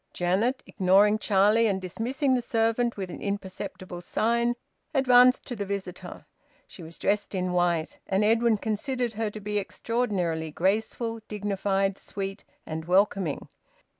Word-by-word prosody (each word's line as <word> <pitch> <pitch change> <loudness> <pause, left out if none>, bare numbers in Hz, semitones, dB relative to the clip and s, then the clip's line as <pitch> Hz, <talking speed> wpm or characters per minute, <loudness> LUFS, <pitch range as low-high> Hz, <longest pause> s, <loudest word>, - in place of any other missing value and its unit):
Janet, 200 +9 0
ignoring 200 +3 +3
Charlie 210 +2 +4
and 195 -2 0
dismissing 250 - -1
the 250 - +2
servant 230 +1 0
with 190 -2 -4
an - - -8
imperceptible 190 -2 -5
sign, 235 +6 +1 0.4
advanced 255 -1 +5
to 245 - -5
the 205 - -3
visitor. 190 -2 -6 0.4
She - - -13
was 165 0 -10
dressed 205 0 -1
in 185 -1 -1
white, 175 -2 0
and 195 +2 +1
Edwin 225 +1 +3
considered 235 +3 -2
her 220 0 -2
to 215 - -8
be 210 0 -1
extraordinarily 190 -7 -2
graceful, 220 +7 -1
dignified, 195 -1 -1
sweet, 195 -1 -6 0.2
and 160 0 -5
welcoming. 185 -3 +1
205 Hz, 135 wpm, -27 LUFS, 185-230 Hz, 0.4 s, advanced